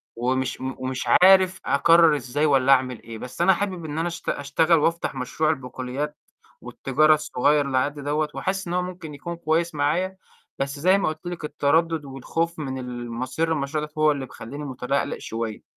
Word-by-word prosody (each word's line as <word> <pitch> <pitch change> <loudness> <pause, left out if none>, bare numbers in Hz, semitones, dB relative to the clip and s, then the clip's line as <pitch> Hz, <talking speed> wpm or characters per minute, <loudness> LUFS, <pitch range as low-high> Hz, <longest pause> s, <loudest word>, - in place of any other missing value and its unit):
ومش 130 +2 -1
م 130 0 -3
ومش 130 0 -3 0.2
عارف 190 0 +6
أقرّر 165 +2 +5
إزاي 145 +3 -1
والّا 135 -2 +4
أعمل 130 -3 0
إيه، 115 -1 -8
بس 125 +8 -7
أنا 190 +2 +6
حابب 185 -3 -3
إن 150 +1 -5
أنا 170 - 0
أشت 170 0 -5
أشتغل 155 +4 +2
وأفتح 165 -2 0
مشروع 135 +4 -1
البقوليات 130 +3 -4 0.4
والتجارة 155 +4 +2
الصغير 145 -1 +1
اللي 130 -1 -1
على 130 - +3
قدّي 145 0 -6
دوّة 150 +2 -1
وحاسس 190 -1 -2
إن 175 - -3
هو 180 - +1
ممكن 180 -4 -7
يكون 170 +4 -6
كويس 165 0 0
معايا، 175 +6 0 0.4
بس 140 +1 -3
زي 185 +5 +4
ما 200 - 0
قُلت 155 +2 -8
لِك 175 -3 -5
التَردُّد 155 +1 +1
والخوف 160 +5 -3
من 130 -3 -4
المصير 125 +5 -3
للمشروع 150 0 -1
دوّة 150 - -17
هو 150 - +6
اللي 140 -2 -3
مخلّيني 135 +4 -9
مُتَلَقْلِق 135 +1 -2
شوية. 115 -1 -5
150 Hz, 185 wpm, -24 LUFS, 130-165 Hz, 0.4 s, عارف